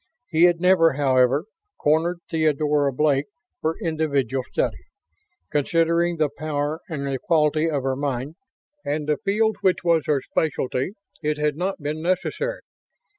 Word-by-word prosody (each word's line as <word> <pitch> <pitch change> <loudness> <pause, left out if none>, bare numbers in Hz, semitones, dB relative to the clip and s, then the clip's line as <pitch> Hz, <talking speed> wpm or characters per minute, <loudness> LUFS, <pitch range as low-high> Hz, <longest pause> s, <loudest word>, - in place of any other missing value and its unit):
He 165 0 +5
had 175 -1 +3
never, 180 -3 +4
however, 135 +1 +2 0.3
cornered 165 +4 +1
Theodora 150 -3 +1
Blake 140 +1 +1 0.3
for 160 +1 -1
individual 140 - -1
study. - - -2 0.7
Considering 170 +3 +1
the 155 -2 +2
power 150 0 -2
and 145 -4 -3
the 135 -1 -2
quality 160 -4 +2
of 145 -4 -1
her 135 0 0
mind, 140 0 -3 0.5
and 150 +1 -2
the 150 -1 +1
field 215 +2 +1
which 185 -2 +2
was 165 -3 +2
her 150 -2 +2
specialty, 135 +1 -1 0.3
it 150 0 -1
had 150 -1 0
not 180 -1 -3
been 150 +2 -3
necessary. 325 - -1
155 Hz, 140 wpm, -23 LUFS, 145-170 Hz, 0.7 s, He